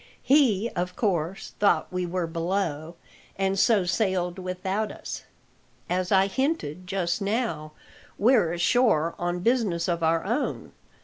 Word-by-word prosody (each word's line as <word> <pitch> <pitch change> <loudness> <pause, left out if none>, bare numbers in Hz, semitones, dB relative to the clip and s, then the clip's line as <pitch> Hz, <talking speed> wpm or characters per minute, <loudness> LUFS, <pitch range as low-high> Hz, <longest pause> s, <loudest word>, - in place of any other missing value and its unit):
He, 250 -7 +4
of 180 +1 -2
course, 185 -4 -2
thought 200 -2 +2
we 180 -1 -1
were 180 0 -1
below, 165 -1 -2 0.4
and 195 0 0
so 205 -4 +4
sailed 185 -1 0
without 190 +3 -2
us. - - -7 0.7
As 185 +1 0
I 190 -1 +5
hinted 200 - -2
just 185 0 -1
now, 200 -8 -2 0.4
we're 215 -6 +4
ashore 170 -2 +2
on 175 0 -2
business 205 -7 +1
of 170 -1 -1
our 165 0 +2
own. 235 +8 -2
185 Hz, 130 wpm, -26 LUFS, 170-210 Hz, 0.7 s, I